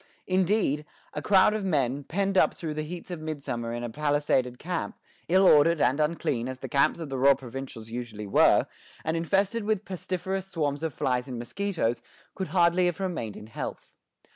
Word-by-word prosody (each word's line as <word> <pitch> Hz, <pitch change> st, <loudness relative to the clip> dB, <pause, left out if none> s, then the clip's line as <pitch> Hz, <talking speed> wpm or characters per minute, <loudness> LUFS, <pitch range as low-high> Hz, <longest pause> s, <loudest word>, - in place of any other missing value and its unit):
Indeed, 185 Hz, -5 st, +1 dB, 0.3 s
a -, -, -3 dB
crowd 200 Hz, +1 st, +5 dB
of 215 Hz, -1 st, -2 dB
men, 140 Hz, -6 st, 0 dB
penned 195 Hz, +6 st, -1 dB
up -, -, +4 dB
through 160 Hz, -3 st, -4 dB
the 155 Hz, -, -3 dB
heats 170 Hz, +4 st, -7 dB
of 175 Hz, -, -4 dB
midsummer 140 Hz, -7 st, -4 dB
in 120 Hz, 0 st, -4 dB
a 120 Hz, -, -3 dB
palisaded 145 Hz, -3 st, +1 dB
camp, 175 Hz, +4 st, -4 dB, 0.3 s
ill 190 Hz, +2 st, +5 dB
ordered 165 Hz, 0 st, +6 dB
and 140 Hz, +1 st, +2 dB
unclean 150 Hz, -6 st, 0 dB
as 130 Hz, -, -5 dB
the -, -, -7 dB
camps 140 Hz, +4 st, +2 dB
of 160 Hz, -3 st, -5 dB
the 135 Hz, -1 st, -3 dB
raw 140 Hz, +1 st, +6 dB
provincials 125 Hz, -3 st, -8 dB
usually 115 Hz, -3 st, -5 dB
were, 100 Hz, -, +5 dB, 0.4 s
and 160 Hz, -, 0 dB
infested 195 Hz, +6 st, +1 dB
with 215 Hz, -1 st, -1 dB
pestiferous 190 Hz, +1 st, -3 dB
swarms 150 Hz, -5 st, -2 dB
of 160 Hz, -1 st, -1 dB
flies 125 Hz, -1 st, 0 dB
and 125 Hz, -2 st, -5 dB
mosquitoes, 120 Hz, -, -2 dB, 0.3 s
could 190 Hz, -, -4 dB
hardly 175 Hz, +2 st, +3 dB
have 175 Hz, -, -2 dB
remained 165 Hz, -, -3 dB
in -, -, -9 dB
health. 115 Hz, -, -7 dB
155 Hz, 185 wpm, -27 LUFS, 130-185 Hz, 0.4 s, ordered